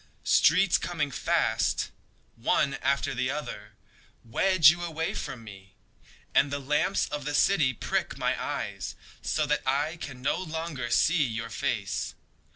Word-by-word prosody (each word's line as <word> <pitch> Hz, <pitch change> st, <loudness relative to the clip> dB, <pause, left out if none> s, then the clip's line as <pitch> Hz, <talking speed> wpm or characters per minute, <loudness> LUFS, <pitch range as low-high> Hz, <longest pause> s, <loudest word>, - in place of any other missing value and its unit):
Streets 180 Hz, +4 st, +4 dB
coming 150 Hz, -5 st, -2 dB
fast, -, -, 0 dB, 0.4 s
One 135 Hz, +4 st, +1 dB
after 140 Hz, +1 st, +1 dB
the 130 Hz, 0 st, -1 dB
other, 110 Hz, -7 st, -5 dB, 0.5 s
Wedge 160 Hz, +6 st, +5 dB
you 175 Hz, +1 st, -5 dB
away 160 Hz, -1 st, -2 dB
from 120 Hz, -3 st, -5 dB
me, 95 Hz, -3 st, -13 dB, 0.6 s
And 140 Hz, -, +4 dB
the 140 Hz, -, -2 dB
lamps 145 Hz, +2 st, +1 dB
of 145 Hz, -1 st, -4 dB
the 145 Hz, +1 st, -2 dB
city 155 Hz, -6 st, +4 dB
prick 125 Hz, -, -2 dB
my -, -, +1 dB
eyes -, -, -4 dB, 0.3 s
So 155 Hz, -, 0 dB
that 150 Hz, 0 st, +1 dB
I 145 Hz, +5 st, 0 dB
can 135 Hz, -6 st, -8 dB
no -, -, +1 dB
longer 160 Hz, -7 st, -4 dB
see 165 Hz, +6 st, +3 dB
your 115 Hz, -2 st, -3 dB
face. -, -, -2 dB
145 Hz, 145 wpm, -28 LUFS, 125-160 Hz, 0.6 s, Wedge